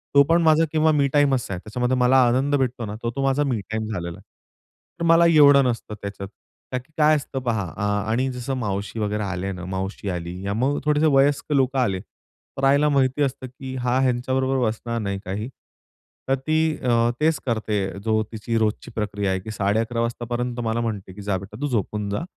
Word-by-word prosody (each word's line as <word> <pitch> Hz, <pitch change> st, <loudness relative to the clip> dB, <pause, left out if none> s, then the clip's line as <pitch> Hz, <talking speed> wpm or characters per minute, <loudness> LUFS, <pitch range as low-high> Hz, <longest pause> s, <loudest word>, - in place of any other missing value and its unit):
तो 140 Hz, -, +8 dB
पण, 165 Hz, +4 st, +3 dB
माझा 160 Hz, 0 st, +4 dB
किंवा 160 Hz, 0 st, +3 dB
मी 145 Hz, -2 st, +3 dB
टाईमच 140 Hz, -4 st, +3 dB
आहे. 90 Hz, -, -3 dB
त्याच्यामध्ये 125 Hz, +6 st, -1 dB
मला 125 Hz, +1 st, +4 dB
आनंद 135 Hz, +4 st, +2 dB
भेटतोना 120 Hz, -5 st, -2 dB
तो, 115 Hz, -, -1 dB
तो 135 Hz, -, -1 dB
माझा 135 Hz, +2 st, +2 dB
मी 125 Hz, -6 st, 0 dB
टाइम 110 Hz, 0 st, -2 dB
झालेला 85 Hz, -3 st, -4 dB
आहे. -, -, -16 dB, 0.8 s
तर, -, -, -2 dB
मला 165 Hz, +1 st, +6 dB
एवढं 145 Hz, -4 st, +7 dB
नसतं 115 Hz, -3 st, -2 dB
त्याच्यात. 100 Hz, -1 st, -6 dB, 0.4 s
कारण, 130 Hz, -1 st, -2 dB
की -, -, -31 dB
काय 155 Hz, 0 st, +5 dB
असतं 140 Hz, -2 st, -3 dB
पहा 115 Hz, -5 st, -1 dB
आ 105 Hz, -, -1 dB, 0.2 s
आणि 130 Hz, +3 st, +1 dB
जसं 125 Hz, +2 st, -4 dB
मावशी 105 Hz, -1 st, -3 dB
वगैरे 105 Hz, 0 st, -1 dB
आले 95 Hz, 0 st, -3 dB
ना, 90 Hz, -2 st, -7 dB
मावशी 95 Hz, +2 st, -4 dB
आली 90 Hz, -1 st, -4 dB, 0.2 s
मग 135 Hz, +5 st, +1 dB
थोडेसे 150 Hz, +1 st, +3 dB
वयस्कर 145 Hz, +2 st, +2 dB
लोकं 135 Hz, 0 st, +2 dB
आले. 95 Hz, -7 st, +1 dB
तर, 135 Hz, -, -14 dB
आईला 140 Hz, +2 st, +4 dB
माहिती 135 Hz, 0 st, +2 dB
असतं, 130 Hz, -1 st, -3 dB
की 130 Hz, +1 st, -8 dB
हा 125 Hz, 0 st, 0 dB
ह्यांच्याबरोबर 130 Hz, +1 st, +1 dB
बसणार 115 Hz, +1 st, -3 dB
नाही 100 Hz, -1 st, -3 dB
काही. 105 Hz, +6 st, -4 dB, 0.8 s
तर, 135 Hz, -, +4 dB
ती 155 Hz, +3 st, 0 dB
अ, 120 Hz, -2 st, +2 dB
तेच 155 Hz, -1 st, +2 dB
करते 110 Hz, -3 st, -1 dB, 0.3 s
जो 110 Hz, -1 st, +2 dB
तिची 115 Hz, +1 st, -2 dB
रोजची 110 Hz, +2 st, -1 dB
प्रक्रिया 100 Hz, -2 st, -1 dB
आहे, 95 Hz, -, 0 dB
की 110 Hz, +4 st, -8 dB
11.30 110 Hz, +3 st, 0 dB
वाजेपर्यंत 120 Hz, +1 st, -3 dB
मला 115 Hz, +1 st, 0 dB
म्हणते, 105 Hz, -5 st, -4 dB
की 105 Hz, -, -10 dB
"जा 100 Hz, -1 st, -1 dB
बेटा 100 Hz, +3 st, -10 dB
तू 145 Hz, -, 0 dB
झोपून 105 Hz, -4 st, -2 dB
जा, 100 Hz, +10 st, -2 dB
120 Hz, 195 wpm, -23 LUFS, 105-135 Hz, 0.8 s, तो